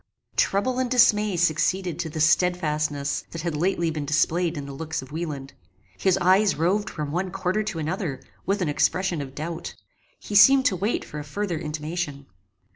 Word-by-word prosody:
Trouble 250 +6 +1
and 255 -1 0
dismay 210 -6 +4
succeeded 175 +1 +1
to 160 - -2
the 155 - -5
stedfastness 155 -3 +1
that 165 -1 -6
had 170 -3 -2
lately 170 0 0
been 155 -2 -3
displayed 160 +3 +1
in 145 - -5
the 140 - -7
looks 160 0 -4
of 130 - -13
Wieland. 150 -4 -5 0.4
His 190 - +2
eyes 190 +2 +4
roved 195 +7 +1
from 150 -2 -5
one 180 +4 -1
quarter 185 +3 -1
to 210 -5 -4
another, 160 -3 -3 0.2
with 195 0 0
an - - -1
expression 175 +3 +1
of 135 -1 -8
doubt. 160 +2 -5 0.4
He - - -8
seemed 265 +6 +7
to 190 - +3
wait 205 +6 -1
for 150 - -7
a - - -5
further 175 +2 -3
intimation. 150 -2 -4
170 Hz, 180 wpm, -25 LUFS, 150-190 Hz, 0.4 s, seemed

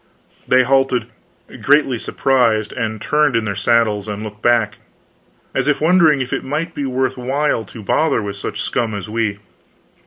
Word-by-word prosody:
They 130 0 +5
halted, 130 -2 +2 0.6
greatly 140 -4 +3
surprised, 115 -6 +1
and 110 -1 -3
turned 150 +2 +1
in 115 -1 +1
their 100 - -2
saddles 105 0 +1
and 105 0 -5
looked 105 0 -9
back, 115 -4 +1 0.7
as - - -1
if 150 - +2
wondering 160 -3 +4
if 130 - -4
it - - -2
might 155 +5 -3
be 145 - -3
worth 130 0 -1
while 135 -1 0
to 110 +2 -11
bother 155 +10 +1
with 100 -1 -5
such - - -5
scum 110 -3 -1
as 100 +1 -6
we. 110 -3 -1
120 Hz, 165 wpm, -18 LUFS, 110-140 Hz, 0.7 s, They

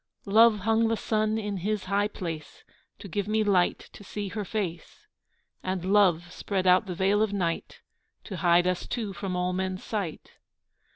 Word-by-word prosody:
Love 215 +1 +5
hung 225 +2 +2
the 225 0 0
sun 215 0 0
in 205 -2 -3
his 205 +2 -2
high 200 +2 +1
place 165 -6 -7 0.3
To - - -10
give 200 +2 -2
me 215 0 +2
light 190 -4 +3 0.2
to - - -12
see 205 0 -5
her 210 +2 -4
face, 185 -5 -5 0.6
And 185 -1 -3
love 175 -4 +3
spread 190 -1 -2
out 185 +3 +5
the 180 - -4
veil 195 +3 +2
of 215 -2 +1
night 170 -4 -2 0.4
To 190 - -6
hide 175 +1 +4
us 180 -1 -1
two 215 -5 -3
from 190 -2 -4
all 180 0 0
men's 185 0 -3
sight. 200 -8 -5
195 Hz, 175 wpm, -27 LUFS, 180-210 Hz, 0.6 s, Love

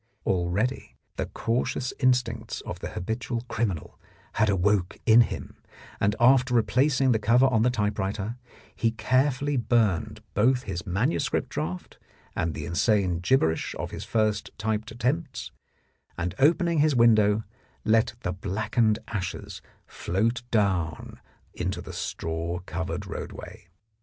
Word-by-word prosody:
Already 95 +8 -1 0.2
the - - -2
cautious 125 +2 -1
instincts 120 -4 +1
of - - -7
the - - -5
habitual 115 +5 -3
criminal 115 -8 -3 0.3
had 110 - +2
awoke 95 -1 +1
in 115 0 +7
him, - - -3 0.4
and 105 +1 +2
after 125 +1 +5
replacing 130 +3 +3
the 110 - +2
cover 120 +5 +4
on 120 -5 +3
the 125 - +4
typewriter 105 0 -2 0.4
he 115 - +2
carefully 130 +4 +1
burned 115 -7 +1
both 125 +5 +3
his 85 -4 -5
manuscript 105 - 0
draft 80 +4 -5 0.4
and 80 -3 -1
the - - -5
insane 90 0 +1
gibberish 90 -5 +1
of - - -5
his - - -6
first 110 -2 0
typed 110 0 -2
attempts, 130 +6 -2 0.7
and 85 0 -2
opening 170 +3 +3
his 150 -1 +3
window 110 -3 +4 0.4
let 110 +1 +3
the 90 - -2
blackened 105 +4 0
ashes 90 -6 -5 0.2
float 115 +7 -1
down 95 - 0 0.3
into - - -3
the - - -8
straw 85 +1 -3
covered 90 +1 -4
roadway. - - -8
110 Hz, 125 wpm, -26 LUFS, 95-125 Hz, 0.7 s, in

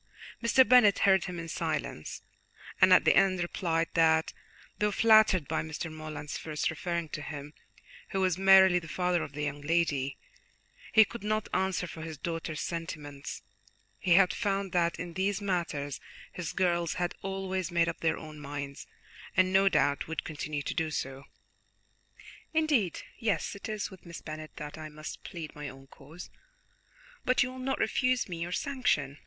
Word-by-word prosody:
Mr. 245 +2 +5
Bennet 220 -4 +7
heard 190 -1 +5
him 180 -2 -5
in 165 0 -5
silence, 155 - -3 0.6
and - - +7
at - - +7
the - - +5
end 195 -1 +4
replied 170 -1 0
that, 160 -1 +3 0.5
though 210 - +2
flattered 215 -7 +5
by 160 - 0
Mr. 160 0 -5
Morland's 155 -1 -6
first 155 -1 -2
referring 170 +1 -3
to 155 - -5
him, 145 0 -7 0.6
who 195 - -2
was 185 -2 +2
merely 190 -1 +7
the 165 - -11
father 180 +1 0
of 145 - -6
the 150 +1 -4
young 145 0 -3
lady, 145 -4 0 0.7
he 220 -1 +7
could 235 -2 -9
not 215 0 0
answer 190 -1 0
for 165 -1 -8
his 160 -1 -6
daughter's 165 0 -4
sentiments; 150 -4 -5 0.6
he 180 - +3
had 185 -1 +5
found 195 -3 -1
that 170 -1 +1
in 175 0 -5
these 190 +3 0
matters 170 -8 -2 0.3
his 175 -3 -4
girls 175 -3 +1
had 175 -1 -1
always 190 -1 -3
made 170 -1 +2
up 170 - -3
their 160 - +1
own 155 -1 -9
minds, 140 -1 -6 0.5
and 185 0 +4
no 195 +1 +5
doubt 140 -6 +1
would 160 0 -3
continue 150 -1 -4
to - - -3
do 160 -2 -1
so. 135 -2 -4 1.3
"Indeed, 290 - +2 0.2
yes, 225 -4 0
it 200 +2 -8
is 215 -1 -3
with 185 -2 -14
Miss 170 - -7
Bennet 155 0 -8
that 150 +1 -7
I 155 0 -7
must 155 0 -8
plead 165 -5 -7
my 150 -1 -6
own 135 +1 -13
cause; 150 +6 -12 0.9
but 255 0 +3
you 250 - -4
will 260 - -9
not 265 +1 -1
refuse 255 -1 +1
me 170 -3 -6
your 175 +1 -3
sanction?" 180 - 0
170 Hz, 170 wpm, -30 LUFS, 155-195 Hz, 1.3 s, Bennet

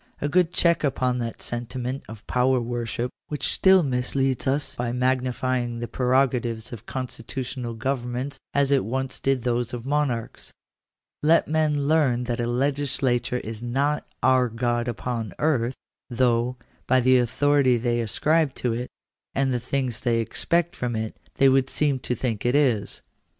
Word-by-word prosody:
A 145 - -1
good 175 +2 +2
check 170 -2 +2
upon 130 -3 0
that 115 -1 -4
sentiment 125 +2 -3
of 110 -1 -10
power 125 +1 +2
worship 120 0 -3 0.2
which 150 -3 -2
still 190 -2 +5
misleads 130 0 0
us 140 +2 0
by 120 -1 -2
magnify 130 0 0
ing 120 -1 -4
the 120 0 -4
prerogatives 125 -3 0
of 115 0 -10
constitutional 125 -1 -4
governments 130 +3 -3
as 140 -1 +2
it 140 -5 +3
once 130 +5 -3
did 135 -3 0
those 120 -1 -1
of 120 - -7
monarohs. 135 -4 -2 0.7
Let 160 +2 +4
men 150 -2 +1
learn 145 -6 +3
that 120 -1 -3
a 120 - 0
legislature 130 -1 +1
is 110 0 -7
not 140 +5 0
" - - -39
our 130 -1 +4
God 120 +1 -1
upon 115 -4 -3
earth," 130 -5 +1 0.3
though, 120 0 +1 0.3
by 130 0 +4
the 130 0 +5
authority 130 +1 +3
they 120 0 0
ascribe 150 +6 +1
to 120 -2 -1
it, 120 +2 -4 0.5
and 135 -1 +1
the 125 - 0
things 130 -1 -2
they 120 -2 +1
expect 170 +8 0
from 120 -2 -2
it, 110 0 -3 0.2
they 135 - +5
would 135 0 +3
seem 145 -3 +1
to 125 - -2
think 115 -5 -2
it 125 +2 +2
is. 125 -9 +1
125 Hz, 160 wpm, -25 LUFS, 120-135 Hz, 0.7 s, still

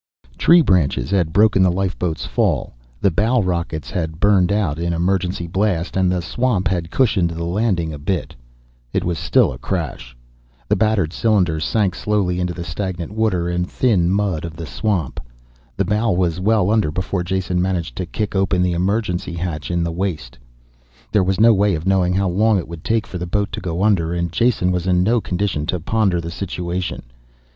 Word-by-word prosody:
XXIII. - - -27
Tree 170 +1 +6
branches 90 - +1
had 90 -5 +1
broken 105 +1 +4
the 95 -1 +4
lifeboat's 90 -3 -2
fall, - - 0 0.3
the 100 - +3
bow 110 +8 +2
rockets 85 -5 -2
had 80 -2 -3
burned 100 -2 +3
out 95 -8 0
in 85 0 -1
emergency 90 +1 0
blast, 90 -1 -1
and 95 -1 +2
the 90 -2 -1
swamp 110 +1 0
had 85 -3 -1
cushioned 100 -7 +2
the 85 0 -5
landing 85 -3 0
a 75 - -7
bit. 90 +5 -2 0.6
It - - 0
was 85 -2 -2
still 65 -4 +3
a 60 - -10
crash. - - -4 0.5
The - - +2
battered 100 -5 +1
cylinder 90 -8 +1
sank 100 +3 +1
slowly 95 -4 0
into 90 -1 -1
the 85 - -5
stagnant 90 +1 -4
water 105 -6 0
and 90 +1 -1
thin 100 -9 +2
mud 95 -4 0
of 85 -2 -6
the 85 0 -6
swamp. 80 - -2 0.6
The - - +1
bow 110 +2 +1
was 90 -1 0
well 105 0 +2
under 110 -7 +2
before 90 +3 -2
Jason 90 0 -1
managed 90 -2 -2
to 90 - -3
kick 105 +2 -3
open 95 -1 +2
the 90 -1 +1
emergency 90 0 -1
hatch 85 -3 -4
in 85 -1 0
the 85 - -2
waist. 80 -9 -3 0.8
There 105 -3 +3
was 95 +1 0
no 115 +1 +7
way 100 -2 +2
of 80 +1 -5
knowing 95 -2 +2
how 100 0 +1
long 105 +4 +2
it 90 - -3
would 85 0 -9
take 115 -1 0
for 90 - -7
the 90 - -4
boat 100 +3 -1
to - - -5
go 85 +1 -2
under, 90 -6 +2
and 85 -1 -2
Jason 110 -3 +2
was 90 0 -2
in 90 -1 +3
no 115 +4 +2
condition 90 -6 -2
to 90 0 -1
ponder 95 0 +1
the 85 0 -5
situation. 90 -1 -4
90 Hz, 195 wpm, -20 LUFS, 85-100 Hz, 0.8 s, no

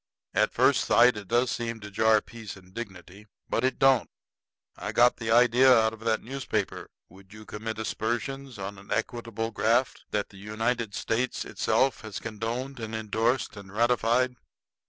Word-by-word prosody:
"At - - +2
first - - +3
sight 120 +1 +5
it 105 -2 -8
does 120 +3 +2
seem 115 -1 -3
to 105 0 -9
jar 110 +1 +4
peace 115 -3 -9
and 95 -1 -17
dignity. 100 -2 -9 0.2
But 115 - -1
it 130 0 +1
don't. 135 -4 +4 0.7
I - - -5
got 120 +1 +5
the 115 -1 -4
idea 125 +3 +6
out 110 -2 +5
of 115 - -11
that 115 0 0
newspaper. 120 -5 -3 0.2
Would 95 +2 -17
you 110 0 -12
commit 110 +1 -5
aspersions 120 +4 -3
on 95 0 -6
a 100 - -15
equitable 115 -1 -3
graft 115 +3 +1
that 105 -1 -2
the 100 - -15
United 110 +2 -2
States 120 +3 -1
itself 135 0 +1
has 110 -3 -7
condoned 115 +4 -4
and 110 -1 -5
indorsed 110 +3 0
and 100 -2 -11
ratified?" 120 +3 +2
115 Hz, 165 wpm, -27 LUFS, 105-120 Hz, 0.7 s, idea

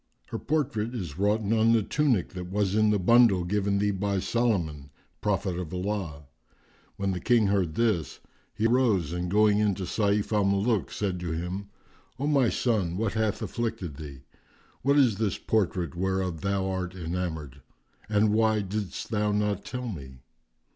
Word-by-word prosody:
"Her - - -4
portrait 125 -6 -1
is 90 -8 -5
wroughten 105 +1 +1
on 115 +1 +4
the 115 -2 +3
tunic 130 - +1
that 90 -1 -7
was 100 0 0
in 110 0 +3
the 105 - +3
bundle 105 -1 +5
given 100 +2 0
thee 105 +1 +1
by 100 0 -1
Solomon, 90 - -1 0.3
prophet 95 -3 -1
of 85 -3 -5
Allah!" 90 -6 -3 0.7
When 100 0 -1
the 90 - -3
King 120 -1 +3
heard 95 -5 +1
this, 110 -9 0 0.3
he 110 - -2
rose, 115 - +2
and 90 0 -2
going 105 +1 +4
in 105 -2 +2
to 95 - -5
Sayf 100 +3 0
al 105 -1 +3
Muluk, 100 +3 +1
said 95 -4 -2
to 85 -2 -3
him, 90 +4 -4 0.5
"O 135 - -2
my 140 -5 +3
son, 100 -8 0
what 110 0 -1
hath 110 -2 -1
afflicted 95 -10 -3
thee? 70 -4 -9 0.6
What 140 +3 +3
is 120 -8 +4
this 110 -3 0
portrait 90 -7 0
whereof 95 -2 -1
thou 100 -1 0
art 95 -1 -3
enamoured? 80 -6 -4 0.5
And 105 0 +3
why 110 -1 +3
didst 100 +2 -4
thou 105 -1 +1
not 105 -1 0
tell 125 -1 -5
me." 65 - -8
100 Hz, 170 wpm, -27 LUFS, 90-110 Hz, 0.7 s, bundle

